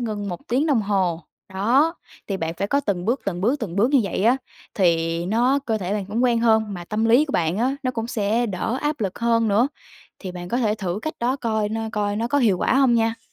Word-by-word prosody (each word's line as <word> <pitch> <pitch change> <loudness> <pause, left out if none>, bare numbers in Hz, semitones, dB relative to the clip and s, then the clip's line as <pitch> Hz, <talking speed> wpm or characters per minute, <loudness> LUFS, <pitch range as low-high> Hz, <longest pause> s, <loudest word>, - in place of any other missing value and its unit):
ngưng 210 -4 -3
1 175 -1 -5
tiếng 260 +6 +1
đồng 270 -8 +2
hồ. 185 -5 0 0.3
Đó, 245 - +2 0.3
thì 195 - -1
bạn 165 -2 -3
phải 195 - -2
có 280 - +2
từng 195 -9 -2
bước, 240 +6 0
từng 175 -3 -3
bước, 245 +9 +1
từng 190 -6 -5
bước 225 +6 +3
như 280 -3 +5
vậy 195 +1 -2
á, 240 +3 +5 0.4
thì 170 -2 +1
nó 240 +7 +2
cơ 220 -2 0
thể 190 +1 -3
bạn 205 -3 -2
cũng 220 +4 -1
quen 235 -2 +2
hơn, 220 -3 +2
mà 175 -1 -7
tâm 215 +5 -1
lý 235 +6 +5
của 290 - -6
bạn 170 +3 0
á, 260 +4 +1
nó 255 - 0
cũng 230 -2 -4
sẽ 230 0 0
đỡ 225 +5 -2
áp 295 -2 -1
lực 195 -3 -3
hơn 230 -1 +2
nữa. 220 +6 +3 0.5
Thì 185 -3 -6
bạn 175 0 -7
có 240 - -1
thể 215 -4 +1
thử 190 -1 -3
cách 315 0 -3
đó 250 +3 +1
coi 220 -5 -1
nó 225 +1 -3
coi 205 -1 -1
nó 230 +2 -1
có 285 +3 +2
hiệu 210 -8 +3
quả - - +1
không 265 -3 +4
nha. 225 0 +1
220 Hz, 255 wpm, -23 LUFS, 195-240 Hz, 0.5 s, như